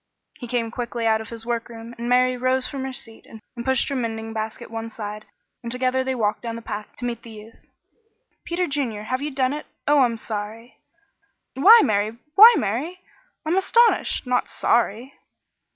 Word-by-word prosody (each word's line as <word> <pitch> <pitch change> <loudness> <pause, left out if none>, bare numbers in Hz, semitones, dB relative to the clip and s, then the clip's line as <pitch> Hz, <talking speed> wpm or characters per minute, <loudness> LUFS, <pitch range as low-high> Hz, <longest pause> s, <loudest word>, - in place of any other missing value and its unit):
He 245 - -7
came 230 -2 -1
quickly 240 -1 -4
out 220 -1 +3
from 220 - -8
his 230 -1 -8
workroom, 235 -1 -5
and 235 +1 -5
Mary 255 0 +3
rose 255 +1 0
from 275 -2 -5
her 265 - -4
seat 225 -3 -8
and 225 - -12 0.2
pushed 265 0 +1
her 280 - -2
mending 225 -2 -3
basket 220 0 -5
one 225 0 -5
side, 210 -1 -7 0.4
and 235 - -6
together 255 +1 0
they 260 0 -2
walked 210 -3 0
down 230 -1 -5
the 230 - -8
path 210 -1 -6
to 245 - -6
meet 235 -2 -3
the 235 - -12
youth. 220 +1 -14 0.8
"Peter 350 +1 -1
Junior, 265 -9 -3
have 255 +4 -2
you 295 - -2
done 265 -1 0
it? 300 - -6 0.2
Oh, 295 0 +5
I'm 240 -3 +3
sorry!" 220 +2 -7 0.7
"Why, 425 - +8
Mary! 215 +1 0 0.2
why, 450 +6 +10
Mary! 300 - -2 0.4
I'm 330 +4 +1
astonished! 465 0 +3
Not 250 0 0
sorry?" 235 +3 0
240 Hz, 185 wpm, -23 LUFS, 225-265 Hz, 0.8 s, why